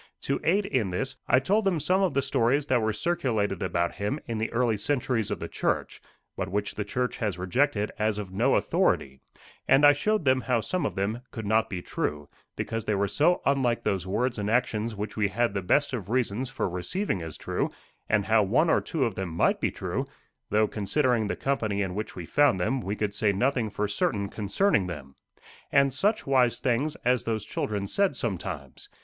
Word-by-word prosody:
To 140 Hz, -, -1 dB
aid 195 Hz, +4 st, +2 dB
in 115 Hz, -, 0 dB
this, 135 Hz, +10 st, -3 dB
I 130 Hz, -, +5 dB
told 200 Hz, +11 st, +1 dB
them 190 Hz, -5 st, +1 dB
some 185 Hz, +6 st, +2 dB
of 190 Hz, -3 st, +1 dB
the 140 Hz, -, +2 dB
stories 130 Hz, +6 st, +2 dB
that 130 Hz, -4 st, +2 dB
were 110 Hz, 0 st, +1 dB
circulated 110 Hz, -, -1 dB
about 85 Hz, 0 st, -1 dB
him 105 Hz, +9 st, -2 dB
in 115 Hz, -2 st, -3 dB
the 110 Hz, -, -2 dB
early 115 Hz, -1 st, +2 dB
centuries 120 Hz, -1 st, 0 dB
of -, -, -3 dB
the -, -, -4 dB
church, -, -, -2 dB, 0.3 s
but 95 Hz, -, -3 dB
which 105 Hz, +1 st, -2 dB
the 105 Hz, -, -3 dB
church 125 Hz, +4 st, -2 dB
has 105 Hz, -6 st, -2 dB
rejected 105 Hz, +3 st, +1 dB
as 110 Hz, -1 st, +1 dB
of 100 Hz, -3 st, -5 dB
no 120 Hz, +7 st, +3 dB
authority; 65 Hz, -1 st, +1 dB, 0.5 s
and 135 Hz, +2 st, +6 dB
I 145 Hz, -, +9 dB
showed 210 Hz, +5 st, 0 dB
them 130 Hz, -1 st, +4 dB
how 125 Hz, -3 st, +1 dB
some 175 Hz, -, -1 dB
of -, -, -6 dB
them 105 Hz, +5 st, -1 dB
could 110 Hz, -3 st, -6 dB
not 110 Hz, +2 st, +2 dB
be 90 Hz, -3 st, -4 dB
true, 75 Hz, -1 st, -3 dB, 0.3 s
because 115 Hz, -1 st, -3 dB
they 105 Hz, -, +1 dB
were 100 Hz, +1 st, +1 dB
so 170 Hz, -, +2 dB
unlike 130 Hz, -4 st, +1 dB
those 95 Hz, -2 st, -1 dB
words 120 Hz, +4 st, 0 dB
and 105 Hz, 0 st, -1 dB
actions 115 Hz, -2 st, 0 dB
which 105 Hz, +1 st, -5 dB
we 105 Hz, -1 st, +2 dB
had 115 Hz, +2 st, 0 dB
the 100 Hz, -, -1 dB
best 145 Hz, +11 st, +2 dB
of 105 Hz, -6 st, -4 dB
reasons 125 Hz, 0 st, 0 dB
for 135 Hz, -, -2 dB
receiving 95 Hz, -, -2 dB
as 80 Hz, -3 st, -6 dB
true; -, -, -2 dB, 0.4 s
and 105 Hz, -2 st, +2 dB
how 110 Hz, 0 st, +4 dB
one 120 Hz, -, +3 dB
or -, -, +3 dB
two 150 Hz, -5 st, -1 dB
of 115 Hz, -, -1 dB
them 95 Hz, -1 st, -4 dB
might 80 Hz, -, +1 dB
be -, -, +2 dB
true -, -, -3 dB, 0.4 s
though, 105 Hz, +1 st, +3 dB
considering 115 Hz, +2 st, +1 dB
the -, -, -2 dB
company 110 Hz, -7 st, -1 dB
in 95 Hz, -2 st, -3 dB
which 105 Hz, +3 st, -5 dB
we 90 Hz, -, -6 dB
found 145 Hz, -, +3 dB
them, 130 Hz, +9 st, 0 dB
we 100 Hz, 0 st, -3 dB
could 105 Hz, -1 st, -2 dB
say 105 Hz, 0 st, +2 dB
nothing 120 Hz, +2 st, +1 dB
for 105 Hz, 0 st, -2 dB
certain 100 Hz, 0 st, -1 dB
concerning 105 Hz, -, +1 dB
them. 70 Hz, -6 st, -8 dB, 0.6 s
And 140 Hz, -1 st, +4 dB
such 205 Hz, -, +1 dB
wise 130 Hz, -3 st, +3 dB
things 135 Hz, +5 st, 0 dB
as 125 Hz, -1 st, +2 dB
those 110 Hz, -2 st, -2 dB
children 105 Hz, -2 st, -2 dB
said 195 Hz, -, +1 dB
sometimes! 90 Hz, -, -5 dB
110 Hz, 210 wpm, -27 LUFS, 100-135 Hz, 0.6 s, I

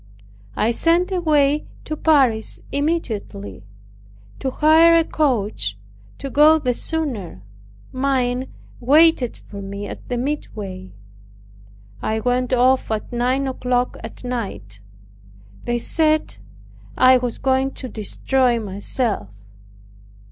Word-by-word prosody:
I 225 Hz, -, +1 dB
sent 335 Hz, +9 st, +2 dB
away 300 Hz, -5 st, +2 dB, 0.2 s
to 310 Hz, -, -3 dB
Paris 265 Hz, -9 st, +2 dB
immediately, 210 Hz, -, -3 dB, 0.7 s
to 265 Hz, -, -2 dB
hire 320 Hz, +4 st, +5 dB
a 330 Hz, -, +4 dB
coach, 215 Hz, -, -1 dB, 0.4 s
to 275 Hz, -, -6 dB
go 305 Hz, +3 st, +6 dB
the 255 Hz, -5 st, -1 dB
sooner; 240 Hz, -, -3 dB, 0.5 s
mine 260 Hz, -1 st, -1 dB, 0.3 s
waited 285 Hz, -1 st, +4 dB
for 200 Hz, -1 st, -10 dB
me 200 Hz, +1 st, -6 dB
at -, -, -10 dB
the 245 Hz, -, -1 dB
midway. 210 Hz, -9 st, -5 dB, 1.1 s
I 220 Hz, 0 st, -1 dB
went 250 Hz, +2 st, 0 dB
off 255 Hz, +1 st, +3 dB
at 220 Hz, +2 st, -3 dB
nine 255 Hz, +3 st, 0 dB
o'clock 250 Hz, -1 st, -1 dB
at -, -, -9 dB
night. 200 Hz, -, -5 dB, 0.8 s
They 240 Hz, 0 st, 0 dB
said. 310 Hz, +5 st, +1 dB, 0.6 s
I 255 Hz, 0 st, +6 dB
"was 245 Hz, -2 st, -3 dB
going 265 Hz, 0 st, +1 dB
to 260 Hz, -, -5 dB
destroy 240 Hz, +3 st, 0 dB
myself." 205 Hz, -, -3 dB
255 Hz, 110 wpm, -21 LUFS, 220-290 Hz, 1.1 s, go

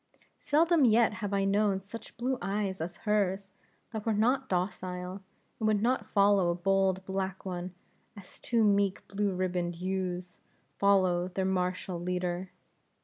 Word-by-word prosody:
Seldom 320 Hz, +1 st, +3 dB
yet 230 Hz, -2 st, +4 dB
have 205 Hz, -1 st, -2 dB
I 195 Hz, -1 st, +1 dB
known 200 Hz, 0 st, +2 dB
such 225 Hz, +4 st, -10 dB
blue 255 Hz, +2 st, -1 dB
eyes 195 Hz, -1 st, -2 dB
as 170 Hz, +2 st, -5 dB
hers, 200 Hz, -2 st, 0 dB, 0.4 s
that 220 Hz, -2 st, -4 dB
were 225 Hz, -1 st, 0 dB
not 255 Hz, +5 st, +1 dB
docile, 180 Hz, 0 st, -3 dB, 0.4 s
and 220 Hz, -, 0 dB
would 215 Hz, -1 st, +3 dB
not 240 Hz, -2 st, +1 dB
follow 200 Hz, -3 st, +4 dB
a 170 Hz, -, +1 dB
bold 190 Hz, +1 st, +1 dB
black 190 Hz, 0 st, -3 dB
one, 180 Hz, -1 st, -5 dB, 0.4 s
as 190 Hz, -3 st, -13 dB
two 235 Hz, -2 st, +1 dB
meek 200 Hz, -2 st, +2 dB
blue 200 Hz, -1 st, -1 dB
ribboned 180 Hz, -1 st, -1 dB
ewes, 180 Hz, 0 st, -3 dB, 0.4 s
follow 185 Hz, -3 st, +3 dB
their 185 Hz, +1 st, -2 dB
martial 185 Hz, -1 st, -1 dB
leader. 180 Hz, +1 st, -2 dB
195 Hz, 145 wpm, -30 LUFS, 180-210 Hz, 0.4 s, yet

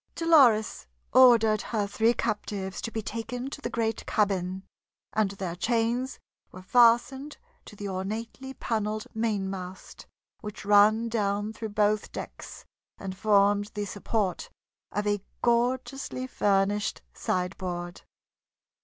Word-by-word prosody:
Dolores 270 Hz, -, +4 dB, 0.3 s
ordered 230 Hz, -4 st, +6 dB
her 215 Hz, -3 st, -1 dB
three 225 Hz, +4 st, +2 dB
captives 195 Hz, -2 st, -3 dB
to -, -, -3 dB
be 220 Hz, -1 st, -4 dB
taken 245 Hz, +5 st, -5 dB
to 285 Hz, -, -7 dB
the -, -, -3 dB
great 225 Hz, -1 st, -1 dB
cabin, 190 Hz, -3 st, 0 dB, 0.5 s
and 215 Hz, -2 st, +2 dB
their 190 Hz, -3 st, -5 dB
chains 235 Hz, +6 st, 0 dB, 0.3 s
were 185 Hz, -, -11 dB
fastened 245 Hz, +6 st, +3 dB, 0.3 s
to -, -, -12 dB
the 205 Hz, 0 st, -6 dB
ornately 220 Hz, +7 st, -5 dB
paneled 215 Hz, -1 st, -2 dB
mainmast 195 Hz, -4 st, -4 dB, 0.3 s
which 210 Hz, -3 st, -8 dB
ran 210 Hz, +3 st, +5 dB
down 205 Hz, -1 st, -1 dB
through 220 Hz, 0 st, -5 dB
both 210 Hz, 0 st, +1 dB
decks -, -, -8 dB, 0.3 s
and 190 Hz, -1 st, -6 dB
formed 205 Hz, 0 st, +3 dB
the 205 Hz, 0 st, -2 dB
support 205 Hz, -, -2 dB, 0.4 s
of 205 Hz, -, -2 dB
a 205 Hz, -1 st, 0 dB, 0.2 s
gorgeously 255 Hz, +2 st, 0 dB
furnished 205 Hz, -3 st, 0 dB
sideboard. 180 Hz, -1 st, -3 dB
215 Hz, 120 wpm, -27 LUFS, 200-230 Hz, 0.5 s, ordered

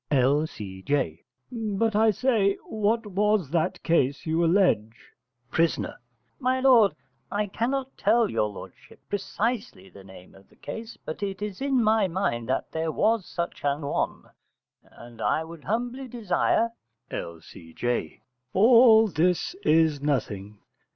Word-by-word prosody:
L.C.J. 130 Hz, -, 0 dB, 0.3 s
But 225 Hz, -2 st, -1 dB
I 220 Hz, +1 st, +5 dB
say, 215 Hz, -3 st, +2 dB
what 220 Hz, +1 st, 0 dB
was 205 Hz, -5 st, +1 dB
that 165 Hz, -2 st, -1 dB
case 140 Hz, -5 st, +1 dB
you 160 Hz, +1 st, +1 dB
allege? 165 Hz, -, +2 dB, 0.6 s
Pris. 165 Hz, 0 st, +2 dB, 0.6 s
My 255 Hz, 0 st, +1 dB
lord, 245 Hz, -6 st, +5 dB, 0.4 s
I 210 Hz, +1 st, 0 dB
cannot 260 Hz, +6 st, -2 dB
tell 235 Hz, -1 st, +3 dB
your 105 Hz, -, 0 dB
lordship 105 Hz, -, -12 dB
precisely 205 Hz, -, -3 dB
the 100 Hz, -, -14 dB
name 95 Hz, -1 st, -14 dB
of 95 Hz, 0 st, -19 dB
the -, -, -23 dB
case, 225 Hz, +1 st, -8 dB
but 155 Hz, -, -6 dB
it 195 Hz, 0 st, -3 dB
is 210 Hz, 0 st, -6 dB
in 270 Hz, -3 st, +2 dB
my 215 Hz, -2 st, +3 dB
mind 145 Hz, -, -2 dB
that 130 Hz, -, -1 dB
there 160 Hz, 0 st, -2 dB
was 215 Hz, +2 st, +1 dB
such 170 Hz, -1 st, -5 dB
an 145 Hz, +1 st, 0 dB
one, 140 Hz, -, -2 dB, 0.6 s
and 120 Hz, 0 st, -14 dB
I 160 Hz, -, +1 dB
would 165 Hz, -2 st, -11 dB
humbly 245 Hz, +5 st, -2 dB
desire 230 Hz, 0 st, +1 dB, 0.4 s
L.C.J. 85 Hz, +7 st, -5 dB, 0.3 s
All 225 Hz, +1 st, +7 dB
this 180 Hz, -, 0 dB
is 155 Hz, -3 st, +3 dB
nothing. 105 Hz, -8 st, -2 dB
185 Hz, 130 wpm, -26 LUFS, 140-225 Hz, 0.6 s, All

